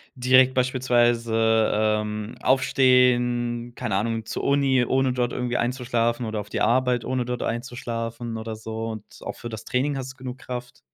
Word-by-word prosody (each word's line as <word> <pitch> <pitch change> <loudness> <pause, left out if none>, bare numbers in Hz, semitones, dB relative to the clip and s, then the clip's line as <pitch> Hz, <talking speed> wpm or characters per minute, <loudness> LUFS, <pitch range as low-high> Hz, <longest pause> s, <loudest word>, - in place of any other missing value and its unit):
direkt 130 +1 +4
beispielsweise, 120 -3 +2
ähm, 105 +1 -1
aufstehen, 120 -2 +2
keine 115 -6 -2
Ahnung, 115 +2 -1
zur - - -4
Uni, 140 -2 +3
ohne 130 -1 +1
dort 125 -1 0
irgendwie 125 -1 -2
einzuschlafen 120 -1 0
oder 110 -1 -3
auf 105 - -7
die - - -3
Arbeit, 125 +2 +2
ohne 130 -2 -1
dort 125 -1 -3
einzuschlafen 115 -1 -4
oder 110 0 -5
so 110 +1 -5
und 110 -2 -6 0.2
auch - - -5
für 120 - -8
das 110 0 -8
Training 135 +2 0
hast 130 0 -5
du - - -33
genug 130 0 -7
Kraft? 125 0 -7
120 Hz, 165 wpm, -24 LUFS, 115-125 Hz, 0.2 s, direkt